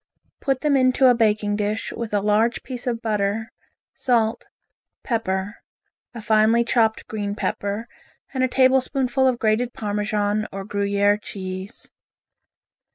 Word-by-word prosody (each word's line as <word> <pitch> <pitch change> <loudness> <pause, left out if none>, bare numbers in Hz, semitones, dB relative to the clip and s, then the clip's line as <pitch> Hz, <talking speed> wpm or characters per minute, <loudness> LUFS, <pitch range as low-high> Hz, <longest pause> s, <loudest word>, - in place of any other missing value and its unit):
Put 270 -2 -1
them 300 -2 +2
into 255 0 +4
a - - +6
baking 210 -3 +1
dish 210 +1 -2
with 230 -2 -5
a 205 -1 +1
large 215 +3 +1
piece 250 -1 -7
of 235 -1 -2
butter, 215 0 -1 0.4
salt, 230 -3 0 0.6
pepper, 205 -3 -2 0.6
a 230 - -6
finely 220 +1 +4
chopped 225 -2 +1
green 205 -2 -4
pepper 205 +2 -3 0.5
and 260 -1 0
a - - +4
tablespoonful 260 0 +2
of 255 -2 +2
grated 235 +2 +1
Parmesan 210 0 -1
or 195 0 -6
Gruyere 200 0 +1
cheese. 190 0 -7
220 Hz, 130 wpm, -23 LUFS, 205-245 Hz, 0.6 s, a